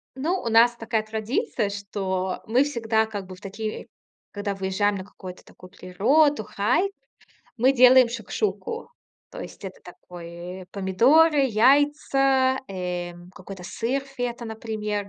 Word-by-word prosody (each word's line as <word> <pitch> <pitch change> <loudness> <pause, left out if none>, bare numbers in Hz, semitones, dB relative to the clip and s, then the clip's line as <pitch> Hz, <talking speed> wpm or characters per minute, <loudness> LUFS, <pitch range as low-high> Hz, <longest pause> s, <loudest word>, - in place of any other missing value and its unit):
Ну, 330 +8 -1
у 230 - -3
нас 235 +2 +5
такая 225 -1 -2
традиция, 220 - -2
что 190 -2 -3
мы 245 +5 +4
всегда, 225 -5 0
как 205 -3 -6
бы, 185 - -9
в 185 - -19
такие, 215 +2 -6 0.4
когда 205 -1 -3
выезжаем 195 +2 0
на 190 - -5
какую-то 185 -2 -11
такую 185 - -15
природу, 245 - +2
хайк, 255 - 0 0.7
мы 255 +3 +4
делаем 255 -1 +7
шакшуку. 430 - -4 0.4
То - - -9
есть - - -10
это 190 -1 -8
такой, 175 +1 -10
э, 180 - -14
помидоры, 260 - +4
яйца, 270 +1 +3
эм, 180 -1 -5
какой-то 185 0 -10
сыр 250 +8 -2
фета, 245 -3 -5
например. 215 -2 -4
220 Hz, 135 wpm, -24 LUFS, 190-260 Hz, 0.7 s, делаем